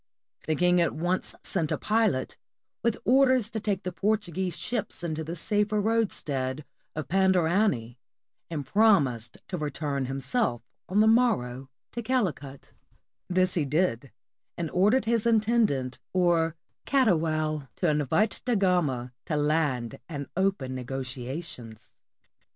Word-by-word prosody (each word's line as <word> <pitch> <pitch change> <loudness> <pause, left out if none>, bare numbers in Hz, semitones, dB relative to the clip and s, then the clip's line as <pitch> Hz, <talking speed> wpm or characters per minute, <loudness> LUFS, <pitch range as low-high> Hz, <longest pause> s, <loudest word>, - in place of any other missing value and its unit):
The 160 - +1
king 180 +2 +3
at 170 - +1
once 175 +4 -1
sent 165 -5 -1
a - - +1
pilot, 215 -12 +1 0.5
with 235 -1 +1
orders 255 -3 +4
to 220 - -2
take 200 -2 -1
the 180 - -3
Portuguese 190 -4 -1
ships 220 -6 -3
into 160 -2 -2
the 165 +2 -5
safer 210 +4 +1
roadstead 150 - -1 0.3
of 155 - -4
Pandarany, 180 - +2 0.5
and 150 -4 -4
promised 145 - +3
to 180 - -4
return 145 -2 -2
himself 135 - -1 0.3
on 200 +3 +3
the 220 - +5
morrow 135 - +2 0.2
to 240 - -4
Calicut; 170 - -2 0.6
this 185 0 +2
he 165 - +1
did, 140 -4 0 0.5
and 165 -2 -3
or 190 +3 +4
dered 255 +1 +2
his 230 0 +1
Intendant, 215 - +2
or 170 -3 +2 0.3
Catoual, 155 - +1
to 180 - 0
invite 150 - +1
Da 245 -2 +1
Gama 155 - +1
to 155 - -2
land 145 -7 0
and 145 -3 -4
open 190 -9 0
negotiations. 130 -2 -6
170 Hz, 130 wpm, -27 LUFS, 140-210 Hz, 0.6 s, the